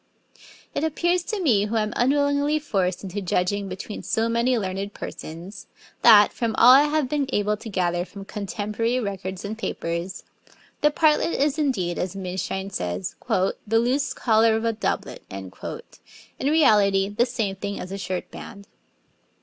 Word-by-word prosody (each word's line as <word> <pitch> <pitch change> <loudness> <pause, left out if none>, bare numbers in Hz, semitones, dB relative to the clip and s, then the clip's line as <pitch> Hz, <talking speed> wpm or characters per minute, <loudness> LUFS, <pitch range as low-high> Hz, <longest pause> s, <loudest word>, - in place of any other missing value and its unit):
It - - -2
appears 345 +3 +1
to 435 -4 -3
me, 230 - +3
who 215 +2 -3
am 215 +1 0
unwillingly 285 +3 +2
forced 190 -11 -1
into 195 +1 -4
judging 195 +2 -1
between 190 +3 -6
so 225 +1 0
many 235 +2 +1
learned 195 0 -3
persons, 175 +5 -8 0.3
that, 210 -3 +7
from 230 -3 -2
all 245 - +8
I 275 +3 +8
have 300 -2 0
been 285 0 -1
able 210 -1 +1
to 220 +2 -9
gather 175 -3 0
from 195 +1 -10
contemporary 215 +4 -2
records 190 -3 -5
and 210 +2 -4
papers, 175 -4 -4 0.6
the 295 - +5
partlet 305 +2 +2
is 290 +2 +1
indeed, 195 - 0
as 185 +1 -3
Minshein 190 +1 -4
says, 90 - -3
'the 190 +1 +2 0.2
loose 265 +4 0
collar 225 -1 +3
of 225 +1 -1
a 230 - +1
doublet,' 220 - -3
in 95 -1 -7 0.9
reality 210 -10 +4
the 210 +5 +1
same 220 -5 -2
thing 200 +1 -5
as 180 - -7
a 195 - -5
shirt 185 -1 -4
band. 200 0 -10
210 Hz, 160 wpm, -24 LUFS, 190-255 Hz, 0.9 s, all